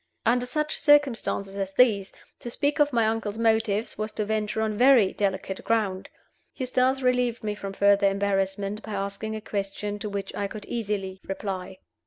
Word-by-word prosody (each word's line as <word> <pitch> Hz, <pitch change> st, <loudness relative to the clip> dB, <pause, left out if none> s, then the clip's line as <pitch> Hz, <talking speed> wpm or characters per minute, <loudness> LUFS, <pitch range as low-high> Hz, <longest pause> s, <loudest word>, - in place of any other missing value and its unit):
Under 245 Hz, +2 st, +2 dB
such 300 Hz, +3 st, -2 dB
circumstances 265 Hz, -9 st, +2 dB
as 195 Hz, -1 st, -4 dB
these, 210 Hz, -6 st, +4 dB, 0.3 s
to 240 Hz, -, -6 dB
speak 285 Hz, +5 st, 0 dB
of 295 Hz, 0 st, +4 dB
my 230 Hz, -3 st, +2 dB
uncle's 220 Hz, -1 st, -1 dB
motives 220 Hz, -2 st, +1 dB
was 215 Hz, +1 st, -2 dB
to 215 Hz, -, -2 dB
venture 215 Hz, 0 st, -1 dB
on 215 Hz, -1 st, -1 dB
very 245 Hz, -4 st, +5 dB
delicate 190 Hz, -1 st, -2 dB
ground. 205 Hz, -5 st, 0 dB, 0.5 s
Eustace 255 Hz, 0 st, +1 dB
relieved 250 Hz, -2 st, +1 dB
me 210 Hz, -1 st, -1 dB
from 200 Hz, -1 st, -6 dB
further 200 Hz, 0 st, +4 dB
embarrassment 195 Hz, +1 st, -1 dB
by 215 Hz, -, -7 dB
asking 200 Hz, +2 st, -3 dB
a 215 Hz, -, -5 dB
question 205 Hz, 0 st, -4 dB
to 210 Hz, -, -4 dB
which 200 Hz, -1 st, -4 dB
I 200 Hz, -, -2 dB
could 210 Hz, +1 st, -8 dB
easily 200 Hz, -4 st, -3 dB
reply. 190 Hz, -1 st, -4 dB
210 Hz, 170 wpm, -26 LUFS, 195-230 Hz, 0.5 s, very